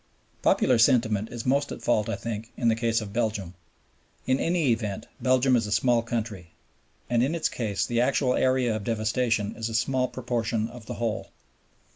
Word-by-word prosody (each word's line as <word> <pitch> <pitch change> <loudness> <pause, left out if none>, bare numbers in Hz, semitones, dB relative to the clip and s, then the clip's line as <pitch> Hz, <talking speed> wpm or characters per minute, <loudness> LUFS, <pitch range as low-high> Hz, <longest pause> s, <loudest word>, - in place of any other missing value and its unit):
Popular 125 -3 +3
sentiment 110 -3 +3
is 120 -2 -6
most 140 +2 +1
at - - -7
fault, 110 -2 +1
I - - -1
think, 115 -1 -5
in 120 -3 +2
the 110 - +3
case 115 0 0
of 100 -2 -7
Belgium. 105 -6 -1 0.7
In 130 +1 +2
any 165 -6 +2
event 110 -4 -2 0.2
Belgium 130 0 +3
is 115 -3 +1
a - - -6
small 120 +1 +3
country, 110 -7 -4 0.5
and 120 -1 +2
in 140 +7 +1
its 165 - 0
case 105 -5 -2
the 120 0 0
actual 130 0 +2
area 130 -3 +2
of 110 - -4
devastation 110 -1 0
is 115 0 -3
a 115 - -4
small 130 +3 +1
proportion 115 -3 -2
of 120 -3 -12
the - - -5
whole. 115 -1 -3
115 Hz, 185 wpm, -26 LUFS, 110-125 Hz, 0.7 s, Popular